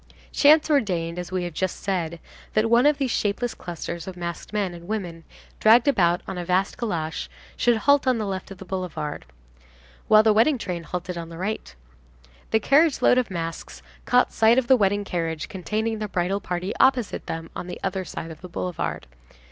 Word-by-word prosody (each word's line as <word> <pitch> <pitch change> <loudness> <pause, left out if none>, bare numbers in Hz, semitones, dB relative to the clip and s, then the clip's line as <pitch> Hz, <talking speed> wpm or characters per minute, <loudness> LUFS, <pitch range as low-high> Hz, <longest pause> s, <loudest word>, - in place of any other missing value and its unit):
Chance 305 +2 +5
ordained, 180 - 0
as 180 0 -6
we 185 -1 -1
have 175 -2 -5
just 185 +3 -2
said, 170 -4 -2 0.3
that 220 +1 +2
one 240 +4 +6
of 295 -1 +3
these 270 -4 -1
shapeless 220 +4 -1
clusters 170 0 -6
of 185 -1 -7
masked 170 -1 -6
men 205 -4 -1
and 170 0 -11
women, 180 -6 -4 0.3
dragged 230 +5 +6
about 175 -10 +3
on 185 - -4
a - - -3
vast 185 +2 0
calash, 165 -9 -3 0.3
should 240 -1 +3
halt 285 +4 +3
on 255 -2 +3
the 215 - -2
left 190 -1 -4
of 195 - -9
the 190 - -10
boulevard, 160 - -4 0.8
while 215 0 +7
the 220 -1 +5
wedding 245 +7 +4
train 180 -6 -4
halted 180 0 -4
on 165 -1 -7
the 165 - -9
right. 200 - -4 0.7
The 220 - +3
carriage 285 +6 +3
load 250 - +5
of 250 - -2
masks 165 -2 -6 0.2
caught 250 0 +3
sight 225 +2 +4
of 260 - +3
the 260 - +6
wedding 205 -2 +1
carriage 165 -4 -3
containing 215 +4 -2
the 215 - -3
bridal 190 +1 -1
party 180 +2 -3
opposite 255 -5 +2
them 165 0 -5
on 180 - -5
the 180 - -7
other 190 -1 -1
side 165 -2 -7
of 155 - -12
the 180 - -9
boulevard. 175 - -4
190 Hz, 195 wpm, -24 LUFS, 175-225 Hz, 0.8 s, while